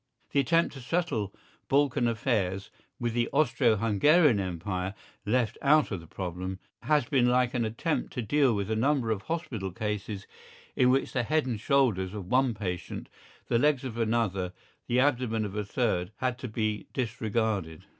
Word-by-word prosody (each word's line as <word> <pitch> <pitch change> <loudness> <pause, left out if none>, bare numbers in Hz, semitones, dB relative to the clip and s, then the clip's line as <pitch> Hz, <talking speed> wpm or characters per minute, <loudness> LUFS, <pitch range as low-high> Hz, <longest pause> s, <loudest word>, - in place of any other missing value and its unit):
The 140 - +2
attempt 165 +5 +2
to 135 - -9
settle 125 - -1 0.4
Balkan 140 -3 +2
affairs 105 -5 -1 0.3
with 120 -2 -1
the 120 0 +1
Austro 120 -6 +3
Hungarian 115 - +4
Empire 95 +1 -3 0.3
left 120 0 +1
out 150 0 +4
of 95 - -2
the 85 - -13
problem 95 +2 -5 0.2
has 145 +1 +2
been 125 -1 +2
like 125 0 +2
an 120 -2 0
attempt 115 +9 -2
to 125 - -3
deal 135 0 +3
with 100 +1 -2
a - - +1
number 125 0 +1
of 105 -3 -1
hospital 120 - -4
cases 105 0 -4 0.5
in 125 - +4
which 135 +2 +1
the 125 - +1
head 155 +5 +1
and 120 -5 -2
shoulders 110 -8 +2
of 100 -3 -5
one 125 +3 +2
patient, 90 -4 -5 0.4
the 115 - +2
legs 145 -1 +2
of 125 -4 -5
another, 110 -6 0 0.3
the 125 - +2
abdomen 125 -5 +1
of 100 -1 -6
a 105 - -1
third 100 -4 -1
had 130 -1 -2
to 130 - -5
be 110 -1 -2
disregarded. 110 - -2
115 Hz, 170 wpm, -28 LUFS, 100-130 Hz, 0.5 s, Hungarian